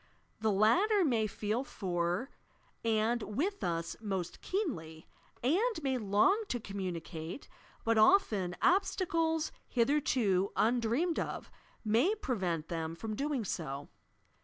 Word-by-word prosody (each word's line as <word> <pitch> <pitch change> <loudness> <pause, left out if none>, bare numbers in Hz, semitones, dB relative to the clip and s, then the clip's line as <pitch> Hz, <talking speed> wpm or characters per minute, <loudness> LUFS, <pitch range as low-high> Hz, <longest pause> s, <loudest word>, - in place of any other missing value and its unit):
The 220 0 +2
latter 360 - +4
may 230 -6 +2
feel 215 +4 -2
for 180 +1 -2 0.5
and 225 +1 +1
with 325 - -2
us 170 -1 -2
most 190 -5 -3
keenly, 165 - -3 0.4
and 370 - +1
may 265 -2 0
long 215 - +3
to 245 - -2
communicate, 180 - -5 0.4
but 225 -1 +3
often 215 - +4
obstacles 330 -4 +2 0.2
hith 235 -1 +1
erto 210 -10 +2
undreamed 240 +9 +1
of - - -4 0.3
may 240 - +3
prevent 185 - -2
them 165 -1 -3
from 215 +4 -5
doing 275 -3 -1
so. 145 -6 -4
225 Hz, 115 wpm, -32 LUFS, 185-300 Hz, 0.5 s, latter